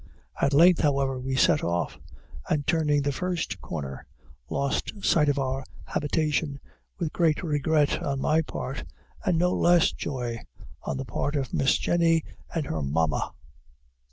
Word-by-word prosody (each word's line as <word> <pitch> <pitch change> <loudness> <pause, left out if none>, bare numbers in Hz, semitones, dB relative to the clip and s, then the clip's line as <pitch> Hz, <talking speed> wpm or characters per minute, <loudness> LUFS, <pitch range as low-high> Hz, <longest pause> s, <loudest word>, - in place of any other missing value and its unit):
At 140 - +3
length, 170 +4 +6
however, 135 -3 +1
we 130 +1 -2
set 135 +2 +4
off, 85 0 -1 0.5
and, 145 -2 +1
turning 150 -2 +2
the 145 - +1
first 170 - -3
corner, 70 -5 -6 0.4
lost 140 0 -1
sight 150 -3 +4
of 145 - +1
our 135 0 -1 0.2
habitation, 150 -1 -1 0.4
with 165 -5 -3
great 165 0 +2
regret 150 -1 +1
on 140 -1 -2
my 155 +4 +3
part, 135 -3 -5 0.4
and 170 - +2
no 180 +2 +3
less 175 -1 +4
joy 125 -5 -4 0.4
on - - -3
the 135 - -4
part 145 +6 -2
of 135 -3 -2
Miss 135 - +3
Jenny 165 -2 +2 0.3
and 165 -3 -2
her 80 - -3
Mamma. 75 +2 0
145 Hz, 150 wpm, -26 LUFS, 135-160 Hz, 0.5 s, length